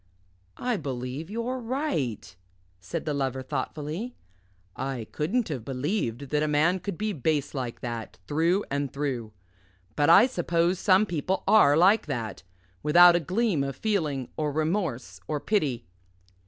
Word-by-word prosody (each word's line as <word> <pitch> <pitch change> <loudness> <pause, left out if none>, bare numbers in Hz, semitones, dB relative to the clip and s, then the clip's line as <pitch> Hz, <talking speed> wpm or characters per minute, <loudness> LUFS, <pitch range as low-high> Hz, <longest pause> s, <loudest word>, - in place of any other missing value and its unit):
"I 245 -3 -1
believe 130 +2 -5
you're 235 +4 -3
right," 225 - -3 0.4
said 90 +1 -5
the 150 - -1
Lover 135 -2 -2
thoughtfully; 150 - -4 0.6
"I 130 -4 -4
couldn't 215 +9 -1
have 135 -7 -4
believed 135 - -3
that 150 0 +2
a 155 - +1
man 155 +5 +2
could 180 -1 -5
be 215 0 -1
base 150 -1 -1
like 125 -4 -4
that, 115 -6 -5
through 170 +7 +1
and 140 -1 -1
through. 130 -6 -3 0.6
But 145 +1 +2
I 200 - +8
suppose 175 -5 0
some 195 +1 +4
people 180 +1 -2
are 150 -9 +6
like 190 +3 +4
that 115 -7 -4 0.4
without 175 +3 +7
a - - +3
gleam 185 -1 0
of 135 0 -4
feeling 155 - -1
or 150 -1 0
remorse 155 - -2
or 150 - -1
pity." 145 - 0
150 Hz, 145 wpm, -27 LUFS, 135-190 Hz, 0.6 s, I